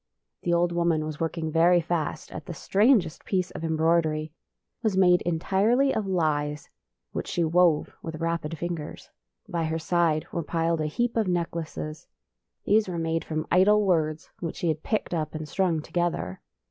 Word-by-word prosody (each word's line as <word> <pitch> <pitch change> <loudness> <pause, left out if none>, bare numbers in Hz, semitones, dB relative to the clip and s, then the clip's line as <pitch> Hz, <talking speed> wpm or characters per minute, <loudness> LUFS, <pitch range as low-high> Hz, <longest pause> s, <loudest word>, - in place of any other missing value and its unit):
The 175 - -1
old 170 0 +3
woman 170 -2 +1
was 155 -1 -6
work 165 +1 -2
ing 160 -1 -2
very 170 +2 +5
fast 160 -2 -3
at - - -8
the 175 - -6
strangest 200 - +2
piece 185 -2 -1
of - - -7
em 160 -1 0
broidery. 160 -1 +2 0.6
It - - -45
was 210 -4 +1
made 180 -2 +5
entirely 200 +10 +2
of 210 -3 -1
lies, 150 -5 -1 0.4
which - - -4
she 175 - 0
wove 165 -1 +3
with 160 -1 -6
rapid 165 -1 -2
fingers. 170 -2 -5 0.4
By 170 -2 -1
her 160 +1 -1
side 165 -1 +1
were 170 - -2
piled 165 0 0
a 155 - 0
heap 240 +10 -1
of 220 -3 +1
necklaces. 165 -2 -3 0.6
These 215 0 +3
were 180 -2 -3
made 165 0 -1
from 155 -1 -3
idle 205 +3 +5
words 155 -4 0
which 165 -3 -4
she 170 - -1
had 155 -1 -1
picked 215 -5 -2
up 155 -2 -2
and 155 0 -5
strung 170 -3 0
together. 175 - -2
170 Hz, 180 wpm, -26 LUFS, 155-180 Hz, 0.6 s, very